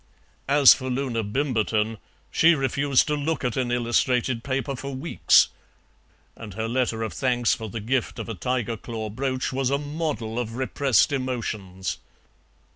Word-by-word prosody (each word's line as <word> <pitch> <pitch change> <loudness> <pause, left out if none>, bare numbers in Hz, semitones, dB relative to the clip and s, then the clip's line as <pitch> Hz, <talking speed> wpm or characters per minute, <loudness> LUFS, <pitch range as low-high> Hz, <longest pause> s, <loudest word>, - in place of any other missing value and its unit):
As 140 -1 +8
for 130 - -5
Loona 125 -3 -1
Bimberton, 110 -2 0 0.3
she 165 +1 +5
refused 135 0 +2
to 150 - -1
look 150 +1 -2
at 125 -2 -1
an 125 -2 -1
illustrated 120 0 +1
paper 135 +1 -2
for 135 +1 -6
weeks, 140 +6 +4 0.9
and 105 -4 -10
her 110 +1 -2
letter 120 -2 0
of 110 -5 -4
thanks 120 +5 +1
for 110 -1 -5
the 115 - -5
gift 120 +3 -1
of - - -5
a 115 - -4
tiger 115 +3 -2
claw 110 -1 -6
brooch 130 +3 -2
was 130 -1 0
a 140 - +2
model 145 -7 -3
of 115 -2 -4
repressed 130 -2 +2
emotions. 110 -8 -3
125 Hz, 155 wpm, -25 LUFS, 115-135 Hz, 0.9 s, As